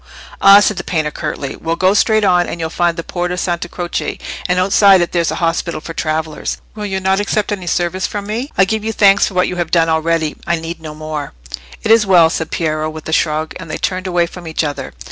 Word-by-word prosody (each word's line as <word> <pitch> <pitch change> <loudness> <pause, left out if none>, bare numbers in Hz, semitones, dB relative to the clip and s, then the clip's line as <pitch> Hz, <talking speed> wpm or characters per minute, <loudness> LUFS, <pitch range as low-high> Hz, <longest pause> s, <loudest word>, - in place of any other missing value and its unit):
"Ah!" 200 +1 +9
said 205 -1 +1
the 175 - -3
painter, 155 -4 -1
curtly. 150 -3 -4
"Well, 165 0 -2
go 185 +3 +3
straight 215 +1 +3
on, 180 -3 +3
and 170 - -5
you'll 160 -1 -3
find 175 -1 0
the 165 - -3
Porta 180 +1 -3
Santa 175 -1 -2
Croce, 175 -1 -3 0.3
and 180 - +2
outside 195 +1 +5
it 175 - 0
there's 170 -2 +1
an - - -3
hospital 165 0 -1
for 165 +1 -8
travellers. 155 -1 -2 0.2
So 215 - -8
you'll 190 -2 -3
not 190 +1 +2
accept 205 +1 -1
any 190 -4 -4
service 175 +2 0
from 205 -1 -5
me?" 230 +7 -4
"I 195 - +5
give 220 +2 -2
you 225 0 -2
thanks 200 -1 +5
for 190 - -8
what 180 - +3
you 180 - -4
have 175 -2 -2
done 165 -1 +3
already. 160 -1 0
I 170 - +2
need 165 0 -6
no 155 -1 -8
more." 155 - -5 0.5
"It - - +1
is 225 -2 +5
well," 170 -4 +6
said 160 -1 -3
Piero, 155 -1 -1
with 155 0 -9
a - - -2
shrug, 155 -1 0
and 165 -3 -9
they - - -3
turned 185 0 -2
away 175 -1 +2
from 175 0 -10
each 160 0 -1
other. 145 -2 -4
175 Hz, 240 wpm, -16 LUFS, 160-190 Hz, 0.5 s, Ah